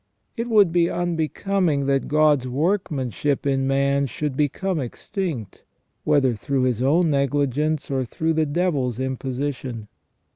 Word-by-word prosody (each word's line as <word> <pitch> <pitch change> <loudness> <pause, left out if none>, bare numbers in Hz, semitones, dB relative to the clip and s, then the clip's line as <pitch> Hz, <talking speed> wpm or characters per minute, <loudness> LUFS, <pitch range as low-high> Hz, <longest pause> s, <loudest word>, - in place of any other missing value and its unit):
It 230 0 -3
would 205 -6 +5
be 170 0 +3
unbecoming 175 -2 0
that 135 0 +1
God's 150 -3 +3
workmanship 145 - -1
in 135 -1 +1
man 140 +1 +2
should 145 +3 -3
become 160 +5 0
extinct, 135 - -5 0.4
whether 140 -4 +3
through 130 +4 -1
his 125 -2 0
own 160 +5 +3
negligence 140 +1 0
or 135 -1 0
through 160 +7 -1
the 155 -1 +1
devil's 145 -7 0
imposition." 130 -3 -4
140 Hz, 130 wpm, -23 LUFS, 130-160 Hz, 0.4 s, would